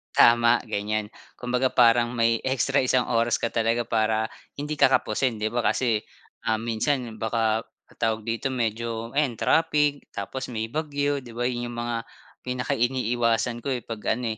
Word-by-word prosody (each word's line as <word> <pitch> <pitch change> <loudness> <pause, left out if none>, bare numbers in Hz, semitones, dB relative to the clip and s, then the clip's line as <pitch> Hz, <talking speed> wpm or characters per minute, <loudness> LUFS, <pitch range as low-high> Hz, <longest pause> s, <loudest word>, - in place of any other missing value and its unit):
Tama, 120 0 +5
ganyan. 105 +1 -2 0.2
Kumbaga, 125 +1 0
parang 120 -1 +4
may 115 -1 +2
extra 135 +1 +1
isang 130 -1 +2
oras 115 0 +2
ka 115 - -2
talaga 115 +1 +1
para 110 -1 0 0.2
hindi 150 +1 -4
ka - - +7
kapusin, 125 -1 +1
di 110 0 -2
ba? 120 - -1
Kasi, 115 -2 +1 0.5
um, 110 - +3
minsan 120 0 -1
baka 110 0 0 0.3
tawag 110 -1 0
dito, 115 +4 -2
medyo 115 -2 -2
ayan, 140 -5 +1
trapik, 150 0 +2
tapos 125 +7 -4
may 110 -2 -4
bagyo, 145 -2 -1
di 120 -3 -12
ba? 120 - -2
Yun 120 -1 -1
yung 120 - -7
mga 120 -1 -2 0.5
pinaka 125 -1 -2
iniiwasan 120 -1 +1
ko, 120 - -8
eh, 120 - -5
'pag 110 -1 -2
ano, 120 -2 -2
120 Hz, 165 wpm, -25 LUFS, 115-130 Hz, 0.5 s, ka